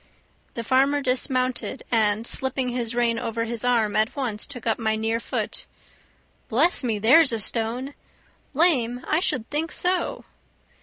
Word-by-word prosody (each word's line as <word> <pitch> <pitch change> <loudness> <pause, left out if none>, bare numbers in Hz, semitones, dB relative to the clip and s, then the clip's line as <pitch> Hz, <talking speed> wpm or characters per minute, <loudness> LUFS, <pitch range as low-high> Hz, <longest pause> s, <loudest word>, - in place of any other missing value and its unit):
The 235 - -4
farmer 270 +4 +2
dismounted, 255 -1 -1
and 220 -1 +2
slipping 265 0 -1
his 240 -1 -2
rein 235 -1 +1
over 230 0 -3
his 235 0 -3
arm 230 -4 +1
at 215 +1 +1
once 240 -7 -3
took 250 -5 -9
up 225 0 0
my 220 -1 0
near 225 +1 -1
foot. - - -4 0.8
"Bless 290 +8 +2
me, 225 -4 -1
there's 260 +8 +5
a 230 - -2
stone! 235 +6 -1 0.6
Lame! 255 -7 +2
I 310 - +2
should 255 - -1
think 310 +3 -1
so!" 360 -1 0
245 Hz, 150 wpm, -24 LUFS, 225-265 Hz, 0.8 s, there's